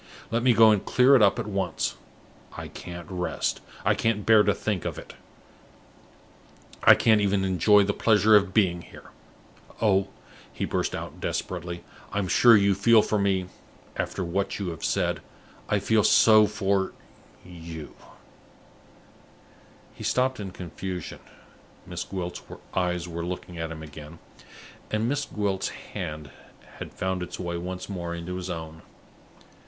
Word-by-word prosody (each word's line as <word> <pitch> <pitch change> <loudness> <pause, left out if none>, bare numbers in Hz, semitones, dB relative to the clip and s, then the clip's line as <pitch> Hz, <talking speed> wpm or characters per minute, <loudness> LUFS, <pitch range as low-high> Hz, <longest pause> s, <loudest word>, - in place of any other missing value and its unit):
Let 115 +1 +1
me 125 0 +4
go 110 0 +7
and 105 -2 +1
clear 130 +2 +5
it 125 - +5
up 100 +1 +4
at 120 - -3
once. 95 -5 -2 0.6
I - - -6
can't 85 -1 -9
rest; 90 -2 -2 0.2
I - - +4
can't 110 -2 -1
bear 110 -1 +6
to - - +3
think 105 -5 -2
of - - -4
it; - - -10 1.7
I - - +9
can't 110 -2 +3
even 100 -1 +1
enjoy 100 +2 +4
the 100 +1 0
pleasure 110 0 +4
of 100 -2 +4
being 90 -4 +2
here. - - -14 0.7
Oh," 100 -3 +2 0.4
he - - -3
burst - - -2
out - - -7
desperately, 85 -1 -4 0.3
"I'm 100 -2 -1
sure 115 +3 +6
you 100 0 +3
feel 110 +3 +5
for 105 - 0
me, 95 -2 +1 0.5
after 95 - -3
what 95 +4 -2
you 100 -3 -3
have 80 - -7
said - - 0 0.5
I 105 - +2
feel 105 +2 +2
so 110 0 +6
for 100 -2 -1 0.5
you!" 85 -3 -9 2.0
He - - -10
stopped 130 0 +1
in 100 -2 -5
confusion. 90 0 -7 0.7
Miss 90 -1 -5
Gwilt's 90 -2 -5 0.3
eyes 90 -1 -1
were 85 0 -5
looking 90 -1 -6
at 80 0 -3
him 80 -1 -8
again, 75 +1 -11 0.7
and 110 +1 0
Miss 145 +2 -1
Gwilt's 100 -3 -2 0.2
hand 75 -3 -5 0.5
had - - -7
found 95 -1 -3
its 90 - -6
way 85 -1 -3
once 90 +2 -5
more 85 -3 -4
into 85 +2 -5
his 90 0 -6
own. 80 -2 -6
95 Hz, 150 wpm, -26 LUFS, 85-105 Hz, 2.0 s, I